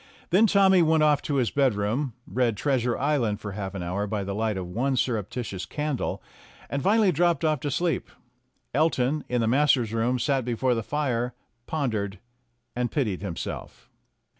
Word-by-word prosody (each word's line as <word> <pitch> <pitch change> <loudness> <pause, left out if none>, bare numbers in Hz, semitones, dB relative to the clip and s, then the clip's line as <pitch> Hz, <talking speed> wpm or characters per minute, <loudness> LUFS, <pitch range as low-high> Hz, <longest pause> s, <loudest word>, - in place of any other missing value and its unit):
Then 205 +6 +6
Tommy 195 -3 +5
went 160 -1 +4
off 150 -2 +4
to 145 - -2
his 125 -6 +1
bedroom, 125 0 +1
read 120 -4 0
"Trea 135 +2 +1
sure 120 0 -1
Island" 130 -8 0
for 105 -2 -6
half 100 0 -5
an 95 - -4
hour 95 +4 -2
by 105 -1 -2
the 100 +1 -4
light 110 0 -1
of 95 - -3
one 130 +9 -1
surreptitious 110 -5 -2
candle, 150 -3 -3 0.5
and 140 - -1
finally 205 +3 +4
dropped 170 +1 +2
off 155 -2 +2
to 145 - -3
sleep. 170 +4 -1 0.6
Elton, 145 -1 +1
in 125 -1 +1
the 115 - +1
masters' 130 -3 +3
room, 115 +3 +1
sat 135 0 +1
before 125 +2 0
the 115 - -1
fire, 125 -2 -1 0.3
pon 145 -6 -1
dered, 100 -2 -3 0.6
and 120 0 0
pitied 110 - -1
himself. 95 -5 -6
125 Hz, 175 wpm, -26 LUFS, 110-150 Hz, 0.6 s, Then